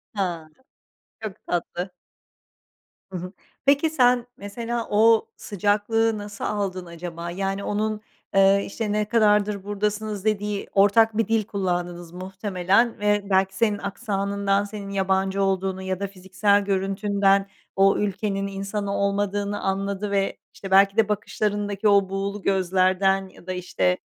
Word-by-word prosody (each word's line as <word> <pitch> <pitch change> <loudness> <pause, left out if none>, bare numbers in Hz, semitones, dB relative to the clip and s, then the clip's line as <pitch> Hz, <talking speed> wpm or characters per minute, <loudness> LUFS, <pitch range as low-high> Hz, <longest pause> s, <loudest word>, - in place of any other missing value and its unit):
Ha, 170 -5 -2 0.7
çok 210 -3 -5
tatlı. 175 +1 -3 1.2
Hı 185 - -4
hı. 180 +1 -6 0.3
Peki, 280 +3 +4
sen 245 -4 +3
mesela 230 +3 -4
o 220 +2 +4
sıcaklığı 215 +3 +1
nasıl 205 0 -8
aldın 190 -3 -2
acaba? 170 0 -7
Yani 195 +2 -2
onun, 215 +1 -1 0.3
eee, 195 0 +5
işte, 210 +1 -3
"Ne 210 0 +1
kadardır 210 -3 +2
buradasınız?" 210 0 -2
dediği 210 -1 -1
ortak 215 +2 +4
bir 225 - +2
dil 225 -1 +2
kullandınız 175 -4 -3
muhtemelen 190 +4 0
ve 205 -1 +1
belki 190 0 +2
senin 210 -1 +1
aksanından, 200 -1 -1
senin 205 -1 -7
yabancı 195 0 0
olduğunu 190 0 -1
ya 190 0 -3
da 200 - -2
fiziksel 195 +1 +1
görüntünden 195 0 +1 0.3
o 195 0 +4
ülkenin 200 -1 -1
insanı 200 +1 -3
olmadığını 200 0 -1
anladı 195 +1 -2
ve, 195 -1 0 0.2
işte, 195 -1 -9
belki 195 +1 +5
de 215 -2 +3
bakışlarındaki 205 0 -1
o 200 -2 +4
buğulu 195 +1 -3
gözlerden 190 0 +2
ya 180 - -18
da, 185 - -2
işte, 95 - 0
200 Hz, 130 wpm, -24 LUFS, 190-210 Hz, 1.2 s, eee